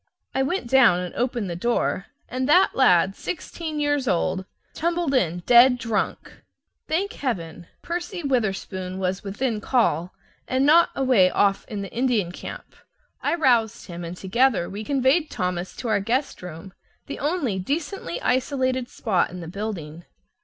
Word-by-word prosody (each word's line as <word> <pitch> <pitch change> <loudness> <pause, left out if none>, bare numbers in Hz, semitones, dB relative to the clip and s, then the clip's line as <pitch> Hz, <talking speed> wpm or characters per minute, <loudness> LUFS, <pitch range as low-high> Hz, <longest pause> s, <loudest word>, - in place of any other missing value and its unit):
I 265 - +1
went 280 +4 -1
down 240 -8 +5
and 180 -1 -5
opened 240 -4 -1
the 170 - -4
door, 195 -1 -1 0.2
and 255 +2 -2
that 360 +5 +5
lad, 190 -6 +4
sixteen 320 -2 -5
years 290 -2 0
old, 185 +1 0 0.3
tumbled 340 -2 -1
in, 175 -8 +1
dead 250 +1 +7
drunk. 230 -3 -3 0.5
Thank 390 +7 -1
Heaven! 175 - -4 0.2
Percy 345 +1 -4
Witherspoon 195 -7 -2
was 190 +1 -2
within 210 +2 -2
call, 205 -8 +1 0.4
and 260 +1 +1
not 330 +4 +6
away 255 -9 +4
off 195 +1 +1
in 205 -2 -4
the 195 - -9
Indian 235 -7 +1
camp. - - -9 0.5
I - - +1
roused 235 -8 +2
him, 175 -1 -7
and 170 +1 -6
together 205 -1 +2
we 205 +2 -6
conveyed 275 +6 +2
Thomas 180 -3 -3
to 245 - -5
our 215 -2 +2
guest 245 +8 -1
room, 180 +2 -9 0.3
the - - -6
only 285 - -1
decently 285 - -3
isolated 255 -1 0
spot 195 -6 0
in 180 - -8
the 165 - -7
building. 175 -4 -6
235 Hz, 155 wpm, -24 LUFS, 185-270 Hz, 0.5 s, dead